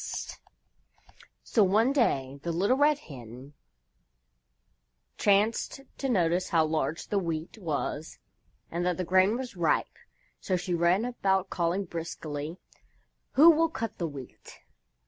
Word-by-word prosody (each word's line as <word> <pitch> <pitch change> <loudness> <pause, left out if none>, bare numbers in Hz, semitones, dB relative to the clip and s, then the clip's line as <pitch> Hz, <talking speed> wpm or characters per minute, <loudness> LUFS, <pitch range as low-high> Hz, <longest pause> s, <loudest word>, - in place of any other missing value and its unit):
So 220 - +3
one 220 +7 +3
day 140 - +1
the 170 - -3
Little 195 +9 +2
Red 295 +1 +4
Hen 130 - -11 1.7
chanced 210 +6 +2 0.2
to 270 - -1
notice 180 -4 +1
how 160 -2 +3
large 155 0 -2
the 205 - +1
Wheat 165 +3 -4
was 155 -3 -3 0.5
and 170 +1 -2
that 180 -1 0
the 185 - -1
grain 190 +5 +3
was 250 -4 -6
ripe, 170 -3 +1 0.5
so 185 - -1
she 180 0 -2
ran 175 +5 +2
about 195 -6 0
calling 175 +3 0
briskly: 165 -2 -5 0.8
"Who 320 +5 +8
will 330 +1 +2
cut 230 -8 -5
the 170 - -1
Wheat?" 140 -4 -11
180 Hz, 125 wpm, -28 LUFS, 160-220 Hz, 1.7 s, Who